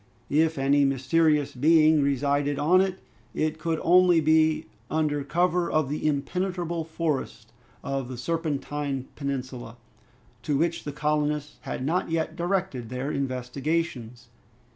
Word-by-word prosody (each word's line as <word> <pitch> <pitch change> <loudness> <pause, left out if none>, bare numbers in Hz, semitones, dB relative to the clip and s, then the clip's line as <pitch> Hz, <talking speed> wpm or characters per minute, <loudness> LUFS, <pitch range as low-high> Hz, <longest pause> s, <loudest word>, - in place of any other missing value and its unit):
If 160 +2 +2
any 140 +1 +3
mysterious 145 +2 +2
being 155 +3 +4
resided 140 +1 +1
on 180 +6 +4
it, 190 -1 -1 0.4
it 155 0 -1
could 160 0 -1
only 180 -1 +5
be 155 0 +3 0.2
under 150 -2 0
cover 175 +3 +1
of 155 -3 +1
the 150 +1 -1
impenetrable 170 +3 -2
forest 160 -3 -3 0.3
of 135 -2 -3
the 130 -1 -7
Serpentine 145 -2 -3
Peninsula, 130 -4 -5 0.6
to 145 -2 0
which 170 +3 -1
the 145 - -3
colonists 150 0 -1
had 130 - -5
not 170 +5 0
yet 165 -1 -1
directed 175 - -2
their 130 +3 -3
investigations. 130 -1 -3
150 Hz, 125 wpm, -26 LUFS, 140-165 Hz, 0.6 s, only